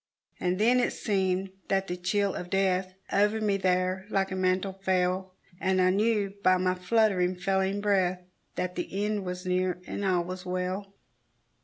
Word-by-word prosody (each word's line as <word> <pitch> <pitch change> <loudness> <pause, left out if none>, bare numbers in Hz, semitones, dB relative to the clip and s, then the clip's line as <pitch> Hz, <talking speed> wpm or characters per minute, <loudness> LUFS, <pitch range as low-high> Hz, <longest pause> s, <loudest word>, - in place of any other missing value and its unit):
And 180 0 0
then 240 +5 +4
it - - +1
seemed 190 -2 0 0.2
that 195 0 +1
the 180 - -3
chill 195 +2 0
of 175 - -6
death 185 -1 +1 0.2
Over 210 +2 +3
me 205 -2 +1
there 185 0 0
like 195 -2 0
a - - -2
mantle 185 +1 +1
fell, 185 0 0 0.2
And 190 0 +1
I 185 0 +4
knew 205 0 +1
by 185 -1 +5
my 185 0 +1
fluttering, 185 -1 +2
failing 190 +2 0
breath 185 -3 +1 0.3
That 180 0 -2
the 195 +3 -3
end 210 -2 -1
was 180 +1 -5
near, 180 0 0
and 200 - -4
all 185 -3 +2
was 180 +1 -6
well. 185 +2 -3
190 Hz, 170 wpm, -28 LUFS, 185-200 Hz, 0.3 s, by